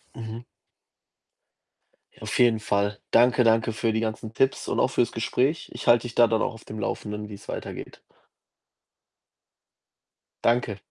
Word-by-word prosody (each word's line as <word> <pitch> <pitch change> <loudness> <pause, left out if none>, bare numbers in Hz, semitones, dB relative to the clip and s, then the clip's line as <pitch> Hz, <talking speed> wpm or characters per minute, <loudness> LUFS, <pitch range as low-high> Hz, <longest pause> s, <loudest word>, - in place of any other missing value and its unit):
Mhm. 115 0 -7 1.8
Auf - - -3
jeden 115 -3 +4
Fall. 100 -1 -1
Danke, 125 +1 +5
danke 115 0 +3
für 110 0 0
die 110 - 0
ganzen 110 0 -4
Tipps 135 +3 +1
und - - -1
auch - - +3
für's 120 - +1
Gespräch. 130 +7 0
Ich - - -8
halt 120 0 +6
dich 120 -1 -6
da 120 - +6
dann 115 0 +1
auch 125 - -1
auf 115 - -14
dem 110 0 -7
Laufenden, 105 +1 -4
wie's 105 0 -11
weitergeht. - - -7 2.4
Danke. 115 -4 +1
115 Hz, 140 wpm, -25 LUFS, 110-120 Hz, 2.4 s, halt